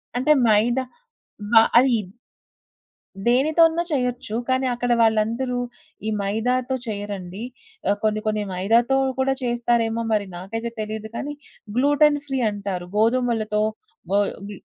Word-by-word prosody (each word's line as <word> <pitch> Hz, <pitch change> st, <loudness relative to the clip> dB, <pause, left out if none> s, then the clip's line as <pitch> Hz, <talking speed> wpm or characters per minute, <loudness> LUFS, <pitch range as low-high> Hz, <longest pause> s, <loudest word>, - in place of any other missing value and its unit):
అంటే 255 Hz, +5 st, +2 dB, 0.2 s
మైద 220 Hz, +3 st, +3 dB, 0.7 s
బ -, -, -3 dB, 0.3 s
అయిద్ 230 Hz, -7 st, +1 dB, 1.2 s
దేనితోన్నా 315 Hz, +7 st, +4 dB
చేయొచ్చు. 250 Hz, -5 st, -2 dB
కానీ 260 Hz, 0 st, +1 dB
అక్కడ 245 Hz, 0 st, -2 dB
వాళ్ళందరూ 230 Hz, +3 st, +1 dB, 0.5 s
ఈ -, -, +1 dB
మైదాతో 245 Hz, +6 st, 0 dB
చేయరండి. 200 Hz, -1 st, -5 dB, 0.5 s
ఆ -, -, +5 dB
కొన్ని 215 Hz, 0 st, +1 dB
కొన్ని 215 Hz, -1 st, 0 dB
మైదాతో 230 Hz, +8 st, +2 dB, 0.2 s
కూడా 265 Hz, +1 st, +2 dB
చేస్తారేమో 235 Hz, -1 st, 0 dB
మరి 210 Hz, -1 st, +1 dB
నాకైతే 225 Hz, +6 st, -5 dB
తెలీదు 215 Hz, 0 st, -5 dB
కానీ, 290 Hz, +4 st, -4 dB, 0.4 s
గ్లూటన్ 290 Hz, +2 st, +4 dB
ఫ్రీ 270 Hz, -2 st, -2 dB
అంటారు. 195 Hz, -3 st, -4 dB
గోధుమలతో 225 Hz, -2 st, +1 dB, 0.5 s
గో 200 Hz, -, +4 dB, 0.3 s
గ్ -, -, -6 dB
230 Hz, 115 wpm, -23 LUFS, 215-255 Hz, 1.2 s, ఆ